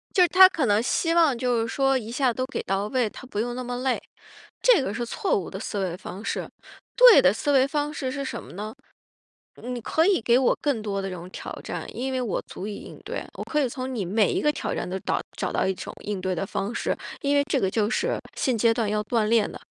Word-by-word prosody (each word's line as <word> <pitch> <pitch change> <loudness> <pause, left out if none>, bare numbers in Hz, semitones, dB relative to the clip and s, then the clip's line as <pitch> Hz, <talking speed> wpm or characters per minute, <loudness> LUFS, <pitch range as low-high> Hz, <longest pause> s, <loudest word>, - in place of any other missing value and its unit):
就 365 - +6
是 355 - +5
他 375 +1 +9
可 320 -8 -1
能 205 0 +3
希 330 +7 +1
望 320 -7 +4
就 245 -1 +1
是 225 - 0
说 270 +2 +2
一 220 - -8
下 255 0 +1
都 255 +2 -2
给 270 - -4
到 195 +1 -1
位， 240 -2 0
他 - - -11
不 210 -5 -3
用 240 +2 -2
那 255 - -4
么 245 0 -4
累， 255 0 0 0.6
这 475 -3 +6
个 205 -7 -3
是 240 +2 -2
错 235 - 0
误 185 - -6
的 190 - -6
思 205 0 -4
维 180 -3 -2
方 200 +2 -9
式。 - - -3 0.5
对 - - +9
的 185 - +5
思 225 +7 -2
维 265 -1 +5
方 295 +1 -2
式 260 -4 -3
是 280 0 -3
什 - - -4
么 - - -13
呢？ 210 +4 -6 0.9
你 250 0 -4
可 320 +8 +2
以 395 -1 +4
给 235 +2 +4
我 260 - +3
更 280 -6 +1
多 200 -2 -3
的 195 - -4
这 - - -5
种 175 0 -8
挑 - - -7
战， - - -5
因 265 +2 -3
为 255 -1 -1
我 220 - -1
足 190 - -7
以 210 - -4
应 - - -10
对。 - - -4
我 - - -6
可 300 - 0
以 265 - +1
从 255 +1 -5
你 205 -6 -2
每 205 +3 +2
一 - - 0
个 300 - +3
挑 - - -3
战 175 - -3
都 190 +1 -3
倒 - - -1 0.2
找 - - -2
到 - - +1
一 190 - 0
种 - - -7
应 205 -2 -3
对 185 -1 -1
的 185 +3 -3
方 205 +4 -3
式， - - -1 0.2
因 285 0 +1
为 285 - +3
这 - - +2
个 190 - +1
就 210 +1 0
是 475 - 0 0.2
现 255 -3 0
阶 225 +1 +4
段 225 -2 -1
要 210 0 0
锻 225 0 +1
炼 220 -1 +3
的。 - - -9
240 Hz, 290 characters per minute, -25 LUFS, 205-270 Hz, 0.9 s, 他